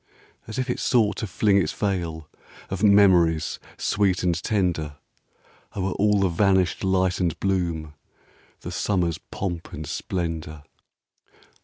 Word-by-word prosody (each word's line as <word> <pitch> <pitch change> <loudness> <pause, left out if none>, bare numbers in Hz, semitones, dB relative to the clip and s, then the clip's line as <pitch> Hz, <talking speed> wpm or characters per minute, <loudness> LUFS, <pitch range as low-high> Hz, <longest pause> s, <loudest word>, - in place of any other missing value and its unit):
As 110 - -6
if 130 0 -1
it 125 - -2
sought 110 -5 +2
to 110 - -3
fling 100 +1 +3
its 75 - -1
veil 85 -6 -3 0.4
Of 95 0 -3
memories, 90 -7 +4 0.2
sweet 95 -3 +1
and 90 -1 +2
tender, 85 -8 -1 0.8
O'er 95 -1 -1
all 105 +1 +2
the 95 - +3
vanished 95 0 +2
light 95 -1 +1
and 85 -3 -1
bloom, 85 -6 -1 0.7
The - - -6
summer's 90 -5 0
pomp 85 -3 -5
and 80 - -6
splendor. 80 -2 -4
95 Hz, 130 wpm, -24 LUFS, 85-100 Hz, 0.8 s, memories